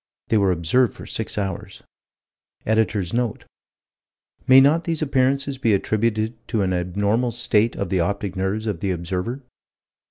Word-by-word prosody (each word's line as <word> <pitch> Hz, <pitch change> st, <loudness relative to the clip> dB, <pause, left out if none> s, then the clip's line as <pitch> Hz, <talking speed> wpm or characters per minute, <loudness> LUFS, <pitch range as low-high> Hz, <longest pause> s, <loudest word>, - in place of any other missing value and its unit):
They 115 Hz, -, +3 dB
were 100 Hz, -2 st, +3 dB
observed 95 Hz, +8 st, +1 dB
for -, -, -10 dB
six 110 Hz, -, -3 dB
hours. 100 Hz, 0 st, -4 dB, 0.8 s
Editor's 105 Hz, -4 st, 0 dB
note: 120 Hz, -2 st, -2 dB, 1.0 s
"May 130 Hz, 0 st, +8 dB
not 150 Hz, +5 st, +4 dB
these 165 Hz, -2 st, -1 dB
appearances 135 Hz, 0 st, 0 dB
be 115 Hz, -6 st, +3 dB
attributed 110 Hz, +2 st, 0 dB
to 110 Hz, -4 st, 0 dB
an 95 Hz, -1 st, 0 dB
abnormal 100 Hz, +7 st, 0 dB
state 115 Hz, -1 st, +1 dB
of 100 Hz, -, -3 dB
the 95 Hz, -, 0 dB
optic 100 Hz, +2 st, -2 dB
nerves 95 Hz, +4 st, -2 dB
of 105 Hz, -6 st, -2 dB
the 100 Hz, -, -2 dB
observer?" 90 Hz, +9 st, -3 dB
110 Hz, 150 wpm, -22 LUFS, 95-125 Hz, 1.0 s, May